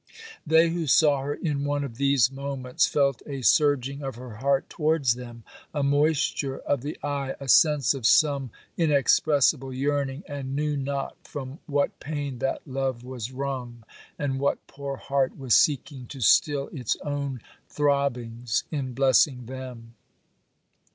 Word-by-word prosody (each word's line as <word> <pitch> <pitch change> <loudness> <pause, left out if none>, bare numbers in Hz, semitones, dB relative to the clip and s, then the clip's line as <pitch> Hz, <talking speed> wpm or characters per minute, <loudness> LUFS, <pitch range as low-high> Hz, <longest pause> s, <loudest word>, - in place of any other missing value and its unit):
They 160 +2 +5
who 165 -1 -2
saw 145 0 +4
her 145 +2 -3
in 145 -4 -2
one 145 0 -1
of 120 -5 -7
these 140 -3 +3
moments, 135 -2 -1
felt 140 -3 +1
a 135 -3 -5
surging 140 -1 +2
of 135 -3 -5
her 120 -3 -9
heart 135 +2 +1
towards 150 -6 +1
them, 120 -1 -10 0.3
a 145 - 0
moisture 145 -1 +1
of 140 -3 -1
the 145 +3 -5
eye, 140 -2 -2
a 140 - -8
sense 150 0 +5
of 130 -5 0
some 140 -4 +3 0.3
inexpressible 145 -3 +3
yearning, 140 +2 -1
and 140 -2 -5
knew 150 0 0
not 140 0 -3
from 135 +1 -7
what 145 -2 0
pain 145 -4 -4
that 135 - -2
love 130 -3 -3
was 125 -2 -6
wrung, 130 -3 -5 0.3
and 135 -2 -2
what 140 +1 -1
poor 140 -1 -6
heart 135 -1 -1
was 130 -4 0
seeking 140 -3 +2
to 135 - -9
still 140 +4 +3
its 125 -8 -2
own 140 -3 -3 0.3
throbbings 125 -5 0
in 135 -5 -3
blessing 130 -1 +3
them. 125 -2 -9
140 Hz, 150 wpm, -26 LUFS, 130-145 Hz, 0.3 s, They